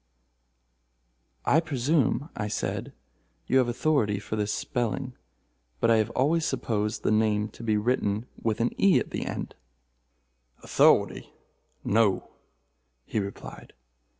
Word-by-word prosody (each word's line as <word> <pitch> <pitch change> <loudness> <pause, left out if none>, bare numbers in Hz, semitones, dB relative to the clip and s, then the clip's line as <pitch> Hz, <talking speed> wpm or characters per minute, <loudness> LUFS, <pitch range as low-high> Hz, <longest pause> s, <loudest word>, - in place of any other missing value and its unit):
"I 160 - +5
presume," 145 -1 0
I 105 - -3
said, - - -3 0.5
"you 130 - +3
have 125 - +2
authority 120 -4 +1
for 100 +2 -5
this 105 -1 -1
spelling, 125 +1 -2 0.7
but 115 - +3
I 115 - +5
have 110 -1 +1
always 155 +5 +2
supposed 105 -6 -1
the - - +2
name 105 -1 +2
to - - -14
be 110 -2 +1
written 105 -1 0 0.2
with 110 0 -1
an 120 - +1
e 195 -2 +6
at - - -5
the - - -3
end." - - -5 1.1
"Authority?—no," 105 -3 +1 0.7
he - - -2
replied. 100 0 -7
115 Hz, 125 wpm, -27 LUFS, 105-130 Hz, 1.1 s, e